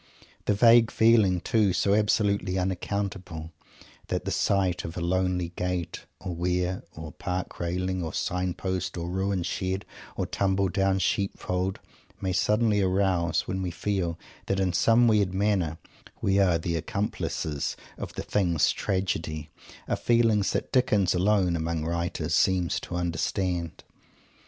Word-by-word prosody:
The 105 - +2
vague 115 +1 +6
feelings, 110 -6 +4
too, 105 -5 +2
so 100 +2 +2
absolutely 100 -2 +2
unaccountable, 95 -3 -3 0.6
that - - -2
the - - -2
sight 95 -3 +1
of 80 +2 -6
a - - -1
lonely 90 0 0
gate, 90 0 -4
or 90 - -5
weir, 90 +2 -1
or 80 -1 -7
park 90 -1 -4
railing, 90 +2 -1
or 80 -2 -3
sign 90 0 -1
post, 95 -1 -3
or 85 0 -3
ruined 95 -1 -1
shed, 95 +2 -2 0.3
or - - -1
tumble 95 -1 +1
down 95 +1 +1
sheep 95 +1 0
fold, 90 +1 -2 0.4
may 95 -2 -1
suddenly 105 +2 +2
arouse, 95 -3 +1
when 95 +1 -2
we 90 - -2
feel 85 -1 -2 0.3
that 100 - 0
in 95 -2 +1
some 115 +7 +4
weird 100 -4 +2
manner 95 -5 +1 0.4
we 100 0 +2
are 90 -4 +4
the 85 +1 -2
accomplices 85 -7 -2 0.2
of - - -6
the - - -5
Thing's 85 -6 +2
tragedy, 80 -5 -2 0.4
are - - +1
feelings 115 -4 +2
that - - -2
Dickens 105 -8 +3
alone 95 -1 +2
among 80 -1 -2
writers 85 +1 -2
seems 90 -2 +2
to 90 - -7
understand. 85 0 -2
95 Hz, 145 wpm, -27 LUFS, 85-100 Hz, 0.6 s, vague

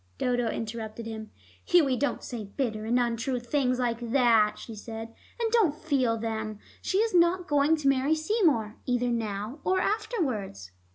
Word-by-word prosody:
Dodo 245 -2 0
interrupted 220 0 -5
him. 220 -1 -6 0.3
"Hughie, 305 -7 +4
don't 285 +4 -1
say 230 -4 -5
bitter 215 0 -3
and 240 +3 +2
untrue 240 +1 0
things 255 +1 0
like 240 -2 0
that," 230 -3 +3
she 230 - -9
said. 225 +1 -7 0.3
"And 455 -1 0
don't 425 -11 +3
feel 270 -7 +1
them. 220 -1 -3 0.2
She 380 - 0
is 445 0 +2
not 350 +1 +3
going 290 +2 +3
to 300 -3 -2
marry 275 +3 +3
Seymour, 310 - +1
either 245 -1 +1
now 220 +2 -3
or 375 0 +2
afterwards." 260 - -2
245 Hz, 160 wpm, -28 LUFS, 225-300 Hz, 0.3 s, Hughie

